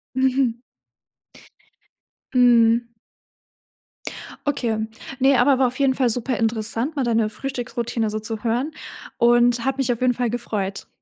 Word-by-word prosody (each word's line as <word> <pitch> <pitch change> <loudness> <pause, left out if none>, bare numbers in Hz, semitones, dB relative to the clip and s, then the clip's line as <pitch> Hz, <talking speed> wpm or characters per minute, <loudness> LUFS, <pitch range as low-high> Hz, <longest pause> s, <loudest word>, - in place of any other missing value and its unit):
Mhm. 260 -2 +2 1.8
Mhm. 235 -1 +4 1.6
Okay, 240 -6 0 0.4
ne, 265 0 +4
aber 265 0 +4
war 265 - +3
auf 255 +3 -7
jeden 265 -1 +3
Fall 255 -3 +2
superinteressant 230 +3 -1
mal 275 - 0
deine 225 -2 +1
Frühstücksroutine 240 -4 -3
so 215 - -3
zu 220 +1 -6
hören 245 +7 0 0.5
und 240 0 +3
hat 270 0 -1
mich 260 -2 +1
auf 235 - -3
jeden 250 -1 +3
Fall 245 -1 -1
gefreut. 210 -5 -4
240 Hz, 125 wpm, -22 LUFS, 230-260 Hz, 1.8 s, Mhm